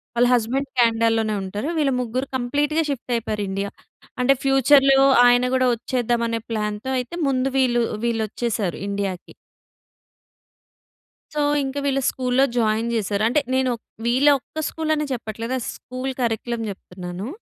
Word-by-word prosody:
వాళ్ళ 240 +1 +4
హస్బాండ్ 250 +4 0
కెనడాలోనే 225 -2 +2
ఉంటారు. 205 +7 -4
వీళ్ళు 280 -4 +2
ముగ్గురు 250 +3 -3
కంప్లీట్‌గా 290 +6 0
షిఫ్ట్ 260 -3 -4
అయిపోయారు 215 -2 -2
ఇండియా. 195 +1 -2 0.5
అంటే, 270 +2 +4
ఫ్యూచర్‌లో 270 0 +5 0.3
ఆయన 245 +1 +4
కూడా 255 0 +3
వచ్చేద్దాం 240 0 -1
అనే 230 0 -2
ప్లాన్‌తో. 210 +2 -3
అయితే 250 +8 -6
ముందు 260 -1 +1
వీళ్ళు 240 -2 +2 0.2
వీళ్ళొచ్చేసారు 220 -3 -2
ఇండియా‌కి... 200 -3 -4 2.0
సో, 300 - -2 0.2
ఇంకా 270 +1 -3
వీళ్ళు 275 -1 +1
స్కూల్‌లో 255 +1 +1
జాయిన్ 225 0 +1
చేసారు. 205 -1 -1
అంటే 245 +6 +2 0.2
నేను, 260 -1 +2 0.3
వీళ్ళ 255 +4 +3
ఒక్క 310 +4 -7
స్కూలని 310 -2 -1
చెప్పట్లేదు. 230 +1 -4 0.2
స్కూల్ 255 +1 -5
కరిక్యులమ్ 235 0 -1
చెప్తున్నాను. 180 +1 -8
240 Hz, 125 wpm, -22 LUFS, 220-265 Hz, 2.0 s, ఫ్యూచర్‌లో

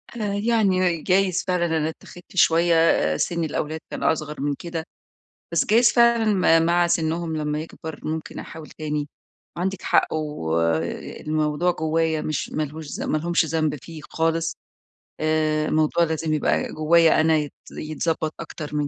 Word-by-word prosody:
أنا 210 -3 -2
يعني 195 -6 +2
جايز 185 0 +2
فعلًا 180 -1 +1
إن 170 - -2
أنا 160 -1 +1
اتَّخِدت 175 +3 -13
شوية، 165 - +4
سِن 170 - -1
الأولاد 155 0 -3
كان - - -5
أصغر 150 -3 -1
من 145 0 0
كده. 165 +1 -5 0.7
بس 170 - +2
جايز 235 +2 +5
فعلًا 235 -1 +4 0.4
م 165 - +1
مع 175 +1 +3
سنّهم 165 0 -1
لمّا 150 0 -2
يكبر. 160 -1 -8
ممكن 160 0 -5
أحاول 160 -1 -9
تاني. 150 -1 -4 0.5
عندِك 190 +2 -2
حق - - +2
والموضوع 150 - -1
جوّايا 160 -1 0
مش 155 -2 -3
مالهوش 155 +1 -4
ذم - - -2
مالهمش 170 +2 +1
ذنب 155 -1 0
فيه 165 -2 -9
خالص. 165 0 0 0.6
آآ 155 -1 +1
الموضوع 155 +2 +2
لازم 160 -1 -1
يبقى 155 - 0
جوّايا 160 +1 +4
أنا 160 0 +3
يت 150 -1 -3 0.2
يتضبّط 155 0 -2
أكتر 155 -2 -7
من 150 -1 0
160 Hz, 145 wpm, -23 LUFS, 155-170 Hz, 0.7 s, جايز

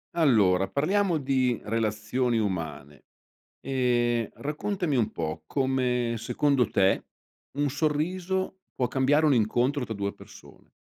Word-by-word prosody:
Allora, 105 - +4
parliamo 185 +4 +1
di 130 -4 +1
relazioni 115 +3 -1
umane. 80 -9 -4 0.6
Ehm, 120 -3 +1
raccontami 155 +2 -2
un 115 -5 +1
po' 80 -1 -4
come, 125 - 0
secondo 125 +1 +1
te, 95 0 +2 0.5
un 145 0 +2
sorriso 175 +6 -1 0.2
può 125 - +1
cambiare 140 +5 +2
un 145 - +4
incontro 125 +5 +1
tra 115 - -5
2 100 -1 -3
persone. - - -16
125 Hz, 115 wpm, -27 LUFS, 110-145 Hz, 0.6 s, Allora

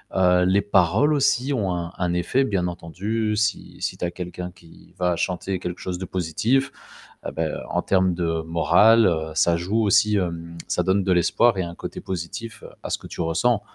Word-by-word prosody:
heu, 90 -1 +4
les 95 +2 +3
paroles 100 - +3
aussi 135 -1 +2
ont 100 -7 0
un 85 0 -4
un 90 -1 -1
effet 90 +10 +1
bien 95 -6 0
entendu 105 +6 -3
si 110 0 -2
si - - -2
tu - - -2
as 85 - -2
quelqu'un 90 0 -6
qui 85 -2 -19
va 90 -1 +1
chanter 90 +1 -2
quelque 90 -1 -5
chose 90 -1 -4
de 95 - -5
positif, 110 +11 0 0.5
ah - - -4
beh, 80 -2 -2 0.2
en - - 0
termes 95 -2 +2
de 80 -2 -1
moral, 105 +7 +4
heu, 80 -2 -1
ça 85 +1 +3
joue 100 +7 0
aussi, 105 +1 +4
hem, 85 -3 -3
ça - - +1
donne 95 +1 +2
de 95 - 0
l'espoir 95 +5 +3
et 95 - 0
un 85 0 -7
côté - - -7
positif 95 +6 -6 0.2
à - - -6
ce - - 0
que - - -12
tu - - -10
ressens, 100 +8 +1
90 Hz, 200 wpm, -23 LUFS, 85-105 Hz, 0.5 s, heu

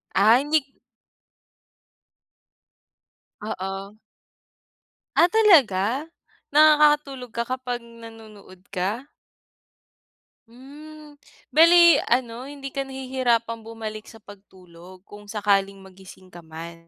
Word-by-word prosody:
Ay 220 +5 +5
hindi 305 +2 +1
k - - -33 2.7
Oo. 195 0 -7 1.2
Ah - - +6
talaga? 275 - +3 0.5
Nakakatulog 295 -5 +3
ka 235 - -2
kapag 245 0 -5
nanonood 225 -5 -15
ka? 205 +9 -4 1.4
Hmm, 295 +4 -15 0.3
bale 335 -1 +6
ano, 240 +1 -2
hindi 275 -1 -9
ka 275 -1 -4
nahihirapan 255 -4 -2
bumalik 220 -1 -8
sa - - -14
pagtulog 185 -2 -16
kung 205 0 -15
sakaling 200 -2 0
magising 190 -1 -16
ka 175 - -12
man? 165 +1 -11
230 Hz, 90 wpm, -23 LUFS, 195-275 Hz, 2.7 s, Ah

